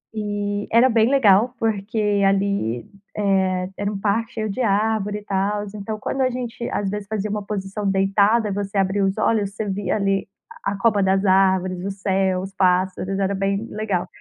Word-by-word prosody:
Eh, 205 -1 -2
era 235 +3 +5
bem 225 -1 +3
legal 240 -3 +4
porque 210 -1 0
ali, 195 - 0 0.3
eh, 190 -2 +1
era 205 0 -2
um 205 - -4
parque 215 +3 -1
cheio 215 -1 -3
de 200 +6 -3
árvore 210 -1 +1
e - - -16
tals. 205 +1 -1
Então, 215 +1 -5
quando 270 +5 -2
a 260 - +3
gente 240 -1 -5
às 200 -1 -1
vezes 205 0 -5
fazia 215 -1 -2
uma 210 0 -3
posição 200 0 -4
deitada, 200 +3 +2
você 200 0 -3
abria 195 +1 +1
os 195 0 -1
olhos, 205 -3 +1
você 215 - -3
via 195 -1 -1
ali 195 -1 0
a - - -54 0.4
a - - -5
copa 205 0 +2
das 190 +1 +2
árvores, 185 -1 +2
o 195 - -2
céu, 190 -1 0
os 190 +1 -7
pássaros. 185 +1 +1
Era 195 0 0
bem 195 +2 -1
legal. 200 -4 -2
200 Hz, 185 wpm, -22 LUFS, 195-215 Hz, 0.4 s, era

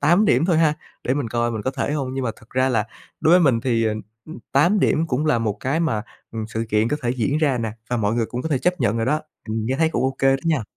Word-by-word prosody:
8 175 +8 +4
điểm 130 -3 +3
thôi 170 -3 +2
ha, 155 -2 +3 0.3
để 130 - +1
mình 140 -5 -2
coi 120 +1 0
mình 110 -3 -4
có 130 - -1
thể 140 - -2
hông. 135 -3 -2
Nhưng 135 -1 -2
mà 115 - 0
thật 115 - -20
ra 130 +1 +2
là 115 -5 +1 0.4
đối 160 - +4
với 180 - +6
mình 135 -8 +3
thì, 115 -2 +1
ờ, 110 -1 +1 0.6
8 175 +9 +4
điểm 160 +2 +2
cũng 140 +3 0
là 120 -6 +3
một 110 -3 -1
cái 145 +6 0
mà, 110 -11 0 0.3
ừm, 110 -1 -3
sự 110 +1 -3
kiện 110 +1 +2
có 150 - 0
thể 120 - 0
diễn 130 +4 0
ra 145 -5 +2
nè, 110 -2 -2 0.2
và 120 - +1
mọi 105 -1 0
người 115 -1 0
cũng 125 +2 -5
có - - -2
thể 145 -4 +1
chấp 180 +6 0
nhận 105 - +1
rồi 115 +1 -1
đó. 150 +3 +1 0.3
Ừm, 110 0 -2
nghe 130 - 0
thấy 160 - +3
cũng 140 -6 -1
ô 130 0 0
kê 135 - +3
đó - - -13
nha. 155 -7 +1
130 Hz, 300 wpm, -22 LUFS, 115-150 Hz, 0.6 s, với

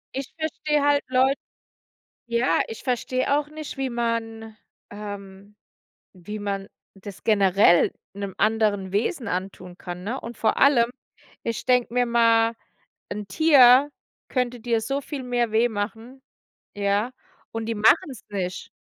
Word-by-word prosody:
Ich 270 -1 -5
verstehe 305 -2 -1
halt 290 0 +3
Leu 260 +1 +3 0.9
ja, 235 +1 +1
ich 225 - -8
verstehe 255 +2 0
auch 295 0 -4
nicht, 305 -1 -8
wie 265 -1 -2
man 225 -2 -3 0.3
ähm, 205 -1 -9 0.6
wie 205 +3 -8
man 200 -1 -3 0.3
das 195 0 -11
generell 195 -4 +4 0.2
'nem 200 -1 -5
anderen 210 -3 +1
Wesen 230 - -1
antun 180 -1 -5
kann, 180 -1 -7
ne? 240 +6 -3
Und 235 -1 -9
vor 225 - +1
allem, 245 -4 +5 0.5
ich 230 -1 -3
denke 250 -2 +2
mir 245 0 +2
mal:” 230 -1 +3 0.5
'N 205 0 -5
Tier 275 +1 +6 0.4
könnte 250 -2 -1
dir 230 -1 0
so 275 +5 -2
viel 280 -1 -6
mehr 240 -2 0
weh 230 +2 +3
machen," 225 +5 -5 0.6
ja? 205 +4 0 0.4
Und 225 0 -3
die 230 - -2
machen's 225 +4 +2
nicht. 185 -3 -4
230 Hz, 135 wpm, -24 LUFS, 205-255 Hz, 0.9 s, Tier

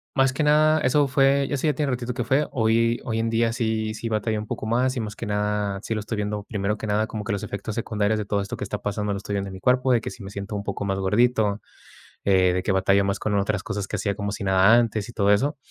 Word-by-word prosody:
más 135 -1 +3
que 135 - -2
nada 155 +1 +4
eso 140 +3 +3
fue 135 +1 +3
eso 140 +2 0
ya 150 - +3
tiene 145 -3 0
un - - 0
ratito 125 0 -4
que 125 - -1
fue, 135 +5 +1
hoy 115 0 +2
hoy 115 -1 -1
en 115 0 0
día, 115 0 +1
sí 110 -2 -1
sí 115 +1 -5
batallo 110 0 -1
un 105 - -6
poco - - -4
más, 125 +4 +1
y - - 0
más 105 -2 -4
que - - -6
nada, 105 -1 -1
si - - -2
lo 110 - -2
estoy 110 +2 -4
viendo, 105 0 -2
primero 105 -2 -2
que 110 - -5
nada, 105 +1 +1
como 110 -1 -5
que 110 - -3
los 100 - -3
efectos 100 +2 -5
secundarios 110 -2 0
de 105 - -3
todo 100 0 0
esto 100 - -5
que - - -5
está 105 0 -4
pasando, 105 0 -2
lo - - -3
estoy 100 +1 -5
viendo 100 -1 -2
en - - -9
mi 95 - -8
cuerpo, 125 +4 +2
de 120 - +3
que - - -4
si 120 - -10
me 95 - -8
siento 100 +1 -5
un 100 - -3
poco 100 0 -4
más 95 -1 -1
gordito, 105 +1 +2 0.6
eh, 95 -2 +4
de 90 0 -1
que 95 - 0
batallo 95 +1 +3
más 100 0 -1
con 105 -1 -1
otras 100 0 0
cosas 105 -3 -4
que - - -3
hacía 100 -2 -1
como 100 -1 -3
si 100 - -5
nada 95 +3 +5
antes 115 -2 +1
y - - -10
todo 100 -3 +2
eso. 140 +9 +1
110 Hz, 290 wpm, -24 LUFS, 100-120 Hz, 0.6 s, nada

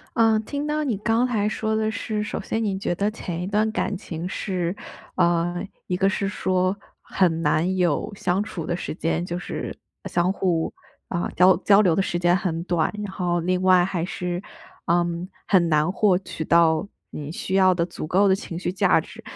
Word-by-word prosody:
嗯。 225 -1 +4
听 285 +5 -3
到 300 0 0
你 240 -7 0
刚 225 +4 +2
才 215 -4 0
说 220 0 -1
的 220 0 0
是， 220 -2 -3
首 210 - -4
先 225 0 -2
你 195 -2 -1
觉 185 - -1
得 200 +4 0
前 175 -5 -5
一 180 - -3
段 210 +2 +1
感 205 - -1
情 175 -2 -6
是 185 -2 -2 0.4
呃， 175 0 +1 0.2
一 180 - -1
个 195 +1 +3
是 195 0 -1
说， 185 -1 0 0.3
很 165 -4 +1
难 165 +4 +1
有 175 +2 0
相 190 0 0
处 175 -6 -6
的 175 - -1
时 175 - -5
间。 165 +1 -1
就 175 0 -4
是， 180 - -5 0.3
相 175 +2 +1
互， 175 -4 0 0.4
嗯， 175 -1 -2
交 185 +1 +6
交 200 +1 +5
流 180 -6 +4
的 195 - +2
时 175 - -2
间 175 0 +3
很 170 -3 -2
短， 175 -3 0
然 195 - -6
后 175 -2 0
另 180 +2 0
外 185 -1 +5
还 180 -3 -2
是， 180 0 -3 0.4
嗯， 170 +1 0 0.2
很 175 -4 +4
难 155 +2 +2
获 195 -1 +3
取 175 -4 -6
到 165 +2 +3 0.2
你 150 0 -6
需 185 - -4
要 185 -1 +5
的 170 -1 +1
足 170 -3 -6
够 190 +5 +3
的 190 - +5
情 170 -3 -6
绪 180 0 -2
价 185 - +3
值。 - - -12
185 Hz, 215 characters per minute, -24 LUFS, 175-200 Hz, 0.4 s, 交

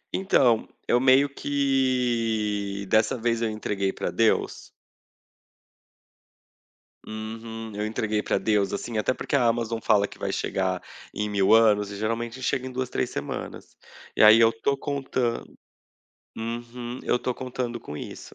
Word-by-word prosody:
Então, 130 - +3 0.2
eu 120 - +4
meio 130 +2 +5
que, 120 -8 0
dessa 110 +4 +2
vez, 115 0 0
eu 115 - +1
entreguei 100 -2 -2
pra - - -4
Deus. - - +1 2.4
Uhum. 110 0 -7
Eu 105 +1 -2
entreguei 110 -1 -1
pra - - +1
Deus, 105 -3 +1
assim, 110 +3 -4
até 110 +4 +1
porque 140 - -3
a 135 - +3
Amazon 115 -1 0
fala 105 -2 +3
que - - -14
vai - - -3
chegar - - -1 0.3
em 105 0 -2
mil 100 0 +3
anos 105 -3 +4
e 100 - -6
geralmente 115 +4 -3
chega 130 -1 -1
em 130 - -6
2, 130 0 -3
3 - - -1
semanas. - - -6 0.4
E - - +4
aí 110 +1 +9
eu 115 -1 +6
tô 135 +5 -1
contando 135 -4 -3 0.8
Uhum. 120 +2 -5
Eu - - +1
estou 125 +1 -2
contando 125 -2 -4
com 75 - -8
isso. - - -9
115 Hz, 145 wpm, -25 LUFS, 110-125 Hz, 2.4 s, aí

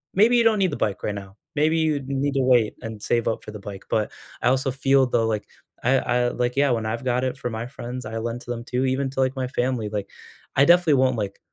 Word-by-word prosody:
maybe 220 +5 +5
you 235 - +5
don't 225 -1 +4
need 190 -2 +2
the - - -2
bike 100 -2 -1
right 105 - -2
now. 100 0 -9 0.2
Maybe 155 +2 +2
you 155 -3 +1
need 140 +1 -1
to 135 - +1
wait 125 -4 +3
and 110 -2 -7
save 115 +2 0
up 110 - -2
for - - -8
the 105 - -8
bike," 100 -1 -9
but, 105 -1 0 0.3
I 120 - +3
also 130 +1 +1
feel 135 +1 +3
though, 115 -2 +1
like, 110 -2 -2 0.4
I 130 +3 +4
I 120 0 +1
like 125 0 -1
yeah, 140 -1 +4
when 115 -2 0
I've 115 +2 -3
got 125 0 +1
it 130 +1 -2
for 125 - -3
my 115 +1 -4
friends, 125 -1 -7
I 110 +1 -5
lend 115 +2 -3
to - - -14
them 120 -1 -4
too, 125 +1 -1
even 135 +1 0
to, 135 - -5
like, 130 +1 +1
my 130 -1 -2
family, 125 -3 -1
like, 105 -2 -4 0.5
I 140 - +7
definitely 175 -2 +5
won't, 130 -1 +3
like, 100 -2 -4
125 Hz, 265 wpm, -24 LUFS, 115-135 Hz, 0.5 s, I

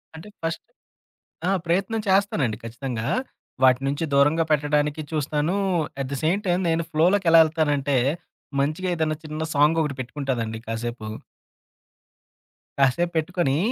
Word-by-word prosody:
అంటే 165 +6 -10
ఫస్ట్ 165 0 -3 0.8
ఆ! - - +2
ప్రయత్నం 195 +6 0
చేస్తానండి 160 - +2
ఖచ్చితంగా. 115 0 -4 0.6
వాటి 130 0 +5
నుంచి 145 +4 -1
దూరంగా 145 +4 +4
పెట్టడానికి 150 +1 +1
చూస్తాను. 150 +3 0 0.5
అట్ 130 - -4
ది 140 - -2
సేమ్ 175 +6 +2
టైం 180 0 +2
నేను 165 0 +1
ఫ్లోలోకెలా 165 +1 +4
ఎళ్తానంటే, 145 -4 +1 0.6
మంచిగా 155 +6 -1
ఏదైనా 155 -1 -1
చిన్న 155 +1 -4
సాంగ్ 150 +3 +4
ఒకటి 140 -3 -3
పెట్టుకుంటానండి 120 -4 -3
కాసేపు. 115 -1 -4 1.7
కాసేపు 170 +6 +2
పెట్టుకొని 160 -3 0
150 Hz, 120 wpm, -24 LUFS, 135-165 Hz, 1.7 s, వాటి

